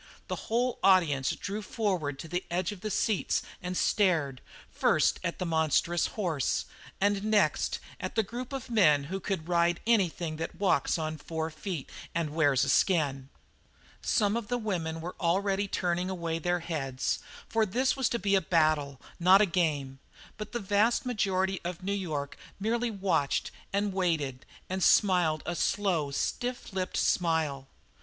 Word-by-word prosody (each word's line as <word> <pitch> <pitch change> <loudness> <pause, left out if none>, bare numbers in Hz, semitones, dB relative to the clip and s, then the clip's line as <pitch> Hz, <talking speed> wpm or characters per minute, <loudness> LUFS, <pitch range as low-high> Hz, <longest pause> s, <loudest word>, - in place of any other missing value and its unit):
The - - -1
whole 245 +2 +1
audience 150 -9 +4
drew 205 +2 -4
forward 185 - -1
to 165 - -8
the 175 +2 -2
edge 175 +2 -1
of 200 -3 -9
the 215 - -3
seats 210 -1 0 0.2
and 180 0 -3
stared, 160 - +2 0.3
first - - +2
at - - -2
the 185 - -3
monstrous 160 +1 +2
horse, 140 - 0 0.3
and 200 0 +2
next 215 -1 +2 0.2
at - - -5
the 220 - +3
group 240 +5 -6
of 270 -2 -5
men 155 -11 +5
who 195 - -1
could 190 -4 -3
"ride 170 -1 +2
anything 175 -8 +1
that 165 - -4
walks 185 -8 +2
on 155 -1 -3
four 160 +1 -4
feet 160 -2 -5 0.3
and 165 -3 -1
wears 145 -5 +3
a 140 - 0
skin." 140 -5 +2 0.7
Some 210 -3 +2
of 235 -3 -3
the 245 +1 0
women 170 -8 -3
were 175 +2 -5
already 195 +3 +1
turning 180 -1 -1
away 170 -3 -2
their 175 +1 0
heads, 135 -6 -2 0.3
for 225 -1 +2
this 245 +6 +1
was 265 -2 +1
to 235 - 0
be 200 -2 0
a 195 - +5
battle, 155 -6 +1 0.2
not 185 +3 +7
a 210 - +5
game; 150 -7 -1 0.4
but 215 -1 -7
the 240 - -2
vast 210 +5 +2
majority 190 -5 0
of 175 +1 -5
New 200 +2 -1
York 155 -8 -3 0.2
merely 235 +3 0
watched 185 -9 0 0.2
and 200 0 0
waited 160 -9 -1 0.2
and 185 0 -2
smiled 175 -6 +4
a 175 - -2
slow, 175 -7 +1
stiff 245 - -3
lipped 185 -1 -2
smile. 160 -6 +1
180 Hz, 165 wpm, -29 LUFS, 155-205 Hz, 0.7 s, not